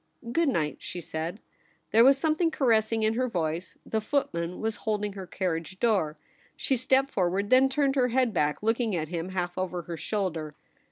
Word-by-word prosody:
' 235 - -8
Good 335 0 +3
night,' 155 - -1
she 180 - -6
said. 165 +4 -4 0.5
There 225 +2 +6
was 270 +2 +7
some 310 +3 +2
thing 335 +1 +2
caressing 225 -6 +2
in 215 0 +3
her 255 +2 0
voice. 170 -4 -3
The 220 - -1
footman 180 -9 -1
was 220 -1 -2
holding 210 -2 -2
her 190 -2 -7
carriage 175 +1 -3
door. 190 -10 +1 0.4
She 270 - 0
stepped 265 +2 +2
forward, 190 +2 0
then 260 +1 +6
turned 275 0 +1
her 255 -2 +3
head 250 -2 +1
back, 150 +1 0
looking 225 -2 +1
at 155 -2 -2
him 170 +1 -3
half 180 -1 -3
over 180 -2 -3
her 170 0 -6
shoulder. 165 -7 -3
205 Hz, 190 wpm, -28 LUFS, 175-250 Hz, 0.5 s, was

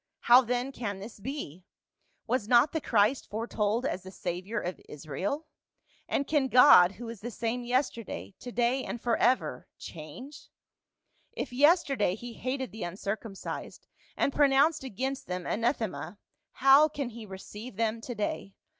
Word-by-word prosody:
How 245 +2 +7
then 250 +2 -2
can 215 -7 -4
this 210 +3 -10
be? 200 - -6 0.6
Was 235 -2 -1
not 245 +4 +5
the 320 - -2
Christ 220 +3 +2
foretold 220 +1 -1
as 190 - -2
the 185 - -10
Savior 185 +4 -4
of 180 -1 -5
Israel? 180 - -4 0.6
And 280 - 0
can 290 -3 +1
God 250 -8 +7
who 230 +5 -9
is 230 -3 -8
the 240 - -4
same 235 +1 -3
yesterday, 235 - -2
to 245 - -8
day 245 +3 +1
and 240 - -5
forever, 245 +2 +1
change? 175 - -10 0.8
If - - -5
yesterday 275 - +3
he 240 +2 -8
hated 260 +2 -3
the 220 - -9
uncircumcised, 195 +3 -5 0.3
and 280 - +1
pronounced 290 +2 +4
against 265 +2 -4
them 180 -1 -4
anathema, 220 - -2 0.4
how 275 +3 +6
can 280 -4 -4
he 225 -1 -9
receive 205 +4 -9
them 225 +1 -1
to 245 +1 -6
day? 200 -2 -3
235 Hz, 145 wpm, -29 LUFS, 200-265 Hz, 0.8 s, How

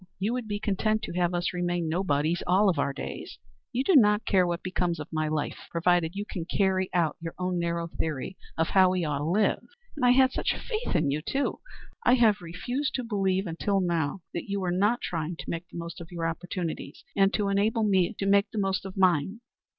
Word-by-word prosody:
You 205 +5 -1
would 250 -3 -3
be 205 -1 -2
content 215 +2 0
to - - -5
have 175 0 +1
us 175 +1 -1
remain 175 -1 -1
nobodies 160 -1 0
all 190 +2 +4
our 140 - +1
days. 140 - -7 0.3
You 255 +1 0
do 370 - +3
not 210 -4 +5
care 185 -3 +3
what 175 0 -2
becomes 180 -2 -1
of 150 - -6
my 155 0 0
life, 155 -1 -3
provided 170 0 +1
you 205 +1 -3
can 180 -5 -5
carry 190 0 +1
out 170 -4 +1
your 165 -1 -6
own 180 -1 -1
narrow 170 0 -1
theory 160 +1 -3 0.2
of 160 0 +1
how 190 -1 +5
we 180 -2 0
ought 145 -2 -1
to 145 - -2
live. 195 +6 +2 0.3
And 290 - -4
I 245 - +6
had 260 +1 +5
such - - 0
faith 455 0 -3
in 140 - +2
you, 150 +2 -1
too! 275 - -1 0.4
I 245 - +5
have 220 -5 +4
refused 245 - -3
to 255 - -1
believe 195 -4 0
until 195 +4 0
now 170 -1 -1
that 170 - -5
you 200 0 -1
were 185 -2 -1
not 205 +7 +2
trying 165 0 -3
to - - -8
make 170 +1 -4
the - - -9
most 170 0 -6
of 165 - -9
your 170 -1 -3
opportunities, 175 0 -5
and 195 -1 +4
to 205 -2 0
enable 210 +3 +2
me 195 0 +2
to 195 - -2
make 200 0 +4
the - - -8
most 195 -1 0
of 190 - -10
mine." 185 +3 +2
185 Hz, 220 wpm, -27 LUFS, 170-205 Hz, 0.4 s, I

